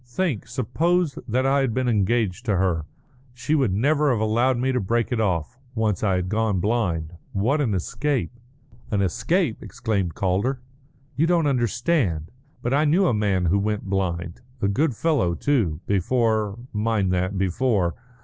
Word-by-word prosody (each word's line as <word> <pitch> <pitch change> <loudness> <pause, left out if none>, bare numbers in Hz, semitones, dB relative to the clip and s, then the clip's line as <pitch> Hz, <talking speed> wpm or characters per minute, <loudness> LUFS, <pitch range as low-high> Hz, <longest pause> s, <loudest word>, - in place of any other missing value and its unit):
"Think! 125 - -2
Suppose 160 +5 0
that 130 +3 +1
I 135 +1 +3
had 130 -4 0
been 130 -1 0
engaged 110 -1 +1
to 105 -4 +1
her! 85 -4 0 0.5
She 125 +5 -2
would 135 -9 +2
never 145 +9 +2
have 120 -5 +1
allowed 120 +4 +2
me 130 +2 +1
to 125 - +1
break 115 +4 0
it 120 -2 +1
off, 90 - -1 0.2
once 110 -4 0
I 95 -3 +2
had 90 0 -1
gone 105 -1 0
blind. 90 -6 -1 0.2
What 125 +10 +1
an 115 -8 0
escape!" 130 - -1 0.6
"An 100 -2 +1
escape?" 90 -4 0
exclaimed 100 -7 -2
Calder. 100 +8 0 0.6
"You 160 +3 +2
don't 170 -2 +2
understand. 120 - 0 0.3
But 120 - 0
I 145 +2 +3
knew 165 +6 +3
a 165 - +3
man 100 -4 +1
who 95 +4 +2
went 105 +1 -1
blind; 85 -3 -2 0.2
a 100 - +1
good 135 +6 +1
fellow, 135 - +1
too, 100 - 0
before 110 +1 +1 0.2
mind 105 -3 +1
that, 90 +2 -1
before! 95 -1 +1
110 Hz, 165 wpm, -24 LUFS, 95-130 Hz, 0.6 s, I